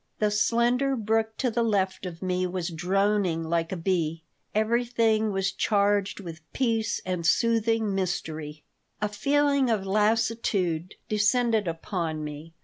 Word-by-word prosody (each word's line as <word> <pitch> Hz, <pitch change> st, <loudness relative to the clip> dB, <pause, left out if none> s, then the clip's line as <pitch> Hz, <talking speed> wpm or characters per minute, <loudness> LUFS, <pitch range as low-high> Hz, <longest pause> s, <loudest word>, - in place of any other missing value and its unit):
The 210 Hz, -1 st, +1 dB
slender 240 Hz, +5 st, +2 dB
brook 220 Hz, -1 st, 0 dB
to 250 Hz, -3 st, 0 dB
the 235 Hz, +2 st, 0 dB
left 195 Hz, -4 st, 0 dB
of 175 Hz, 0 st, -8 dB
me 185 Hz, 0 st, 0 dB
was 180 Hz, -1 st, -3 dB
droning 185 Hz, 0 st, +1 dB
like 165 Hz, 0 st, -1 dB
a 190 Hz, -, -2 dB
bee. 165 Hz, -2 st, -1 dB, 0.3 s
Everything 225 Hz, -1 st, +2 dB
was 195 Hz, 0 st, 0 dB
charged 200 Hz, -1 st, +1 dB
with 165 Hz, -5 st, -8 dB
peace 225 Hz, -5 st, 0 dB
and 180 Hz, -2 st, -2 dB
soothing 225 Hz, +3 st, +2 dB
mystery. 160 Hz, -5 st, -3 dB, 0.4 s
A 210 Hz, -, 0 dB
feeling 280 Hz, +5 st, +2 dB
of 210 Hz, -4 st, 0 dB
lassitude 205 Hz, -4 st, 0 dB
descended 215 Hz, 0 st, +2 dB
upon 165 Hz, -2 st, -3 dB
me. 150 Hz, +2 st, -8 dB
205 Hz, 135 wpm, -26 LUFS, 175-225 Hz, 0.4 s, slender